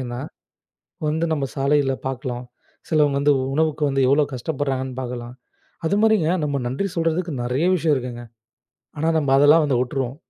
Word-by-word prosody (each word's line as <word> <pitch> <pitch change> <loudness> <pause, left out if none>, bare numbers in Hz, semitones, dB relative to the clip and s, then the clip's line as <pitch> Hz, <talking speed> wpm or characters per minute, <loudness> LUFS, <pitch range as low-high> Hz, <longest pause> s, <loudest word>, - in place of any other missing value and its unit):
ஏன்னா 120 -1 -5 0.9
வந்து 160 +2 0
நம்ம 145 -3 0
சாலையில 140 0 +2
பாக்கலாம். 125 -1 -4 0.4
சிலவங்க 150 -3 +3
வந்து 145 +1 +4 0.2
உணவுக்கு 155 0 0
வந்து 135 0 +1
எவ்வளோ 145 +3 +4
கஷ்டப்படுறாங்கன்னு 130 -1 -3
பார்க்கலாம். 120 -1 -6 0.5
அது 200 - +1
மாதிரிங்க 215 -8 +3
நம்ம 140 -3 -1
நன்றி 135 +11 -2
சொல்றதுக்கு 165 0 -1
நிறைய 125 +7 0
விஷயம் 160 -3 +2
இருக்குங்க. 120 -1 -6 0.7
ஆனா 160 - 0
நம்ம 140 -3 +1
அதெல்லாம் 150 +3 +6
வந்து 135 -4 +1
விட்டுருவோம். 130 0 -2
140 Hz, 145 wpm, -22 LUFS, 130-155 Hz, 0.9 s, அதெல்லாம்